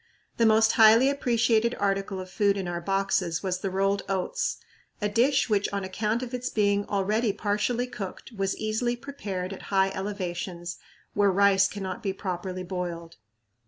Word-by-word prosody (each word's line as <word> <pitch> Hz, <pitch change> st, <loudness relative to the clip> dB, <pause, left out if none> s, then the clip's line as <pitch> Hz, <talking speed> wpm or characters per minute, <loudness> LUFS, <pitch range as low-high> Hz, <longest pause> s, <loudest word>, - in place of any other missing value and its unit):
The 230 Hz, -, +4 dB
most 220 Hz, 0 st, +5 dB
highly 225 Hz, +5 st, +6 dB
appreciated 235 Hz, -3 st, +2 dB
article 195 Hz, -1 st, -1 dB
of 185 Hz, -, -6 dB
food 200 Hz, 0 st, +2 dB
in 190 Hz, -2 st, -3 dB
our 175 Hz, 0 st, -3 dB
boxes 195 Hz, -2 st, 0 dB
was 185 Hz, -1 st, -1 dB
the 195 Hz, -, -2 dB
rolled 195 Hz, +1 st, +1 dB
oats, 195 Hz, -, -1 dB, 0.4 s
a 210 Hz, -, 0 dB
dish 255 Hz, +6 st, +2 dB
which 205 Hz, -3 st, +1 dB
on 200 Hz, -1 st, -2 dB
account 215 Hz, +5 st, -1 dB
of 250 Hz, 0 st, -7 dB
its 250 Hz, 0 st, -2 dB
being 205 Hz, -1 st, +1 dB
already 210 Hz, +3 st, +1 dB
partially 210 Hz, +5 st, -1 dB
cooked 210 Hz, -2 st, -7 dB
was 195 Hz, -3 st, -2 dB
easily 220 Hz, +3 st, -1 dB
prepared 200 Hz, -8 st, -5 dB
at 190 Hz, -, -9 dB
high 195 Hz, -1 st, +3 dB
elevations, 180 Hz, -3 st, -4 dB, 0.3 s
where 205 Hz, -1 st, +3 dB
rice 195 Hz, 0 st, +4 dB
cannot 190 Hz, -2 st, -5 dB
be 195 Hz, -2 st, -2 dB
properly 185 Hz, -1 st, -4 dB
boiled. 175 Hz, -2 st, -5 dB
200 Hz, 160 wpm, -27 LUFS, 190-220 Hz, 0.4 s, highly